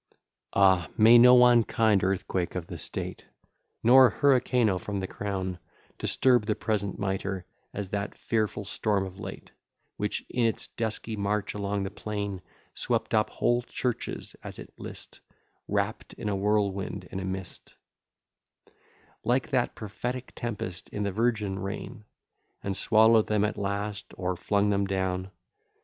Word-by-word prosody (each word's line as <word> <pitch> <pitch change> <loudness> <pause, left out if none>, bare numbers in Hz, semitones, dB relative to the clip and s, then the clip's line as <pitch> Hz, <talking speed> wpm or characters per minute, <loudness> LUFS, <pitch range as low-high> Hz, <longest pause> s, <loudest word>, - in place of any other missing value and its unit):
X - - -41 0.3
Ah! 95 -4 +4
may 115 +2 +8
no 125 0 +8
unkind 115 -4 +4
earthquake 95 -1 -1
of 90 -3 -3
the - - -7
state, - - -3 0.6
Nor 130 +2 +8
hurricano 125 -8 +3
from 100 +2 -4
the 95 - -2
crown, 95 -2 -4 0.4
Disturb 125 -5 +3
the 105 - +1
present 100 -3 -1
mitre, 95 -1 -2 0.3
as 100 -2 -5
that 100 +1 -3
fearful 110 -2 -1
storm 100 -1 0
of 95 0 -10
late, - - -8 0.5
Which, - - -2
in 120 -2 +1
its 110 - -3
dusky 110 0 -3
march 105 0 -1
along 100 -1 -2
the 95 - -4
plain, 100 -3 -4 0.3
Swept - - -1
up 110 -1 +3
whole 120 0 +1
churches 125 0 -3
as - - -6
it - - -11
list, - - -9 0.5
Wrapp'd - - -2
in 105 - -4
a 100 - 0
whirlwind 100 -1 0
and 95 - -4
a - - -4
mist; 95 -1 -6 1.5
Like 125 +4 +1
that 125 -3 +1
prophetic 120 +5 -5
tempest 100 -6 -5
in 105 - -3
the 100 - -1
virgin 105 -2 0
reign, 105 +1 -6 0.6
And 100 -1 -2
swallow'd 110 +2 +5
them 105 -1 +2
at 105 - -2
last, 100 0 -4
or 90 0 -1
flung 100 +3 +1
them 100 0 +1
down. 95 -1 -1
105 Hz, 145 wpm, -28 LUFS, 95-115 Hz, 1.5 s, may